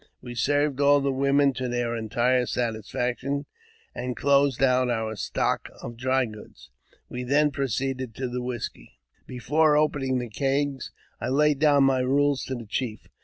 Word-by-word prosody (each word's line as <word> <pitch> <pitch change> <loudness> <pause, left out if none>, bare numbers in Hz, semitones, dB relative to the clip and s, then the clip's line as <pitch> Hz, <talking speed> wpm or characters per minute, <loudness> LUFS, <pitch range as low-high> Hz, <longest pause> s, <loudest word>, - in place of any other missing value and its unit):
We 120 - -8
served 145 +4 +1
all 145 0 +5
the 140 0 0
women 140 +1 +2
to 130 -1 -3
their 120 -1 -1
entire 120 +2 +1
satisfaction, 125 +4 -2 0.5
and 125 0 -4
closed 140 -2 +3
out 130 -1 +3
our 110 -2 -2
stock - - -1
of 120 - -7
dry 130 +2 +1
goods. 110 -2 -13 0.4
We 125 - -6
then 145 +4 +2
proceeded 130 -2 -2
to 130 0 -3
the 125 0 -4
whisky. 120 - -6 0.3
Before 150 +5 +2
opening 140 -4 +1
the 125 -1 -3
kegs, 135 +4 -1 0.3
I - - -3
laid 145 +1 +2
down 145 -2 +5
my 135 -1 +3
rules 140 +2 +1
to 130 - -4
the 120 -2 -7
chief. 110 0 -4
130 Hz, 160 wpm, -26 LUFS, 120-140 Hz, 0.5 s, all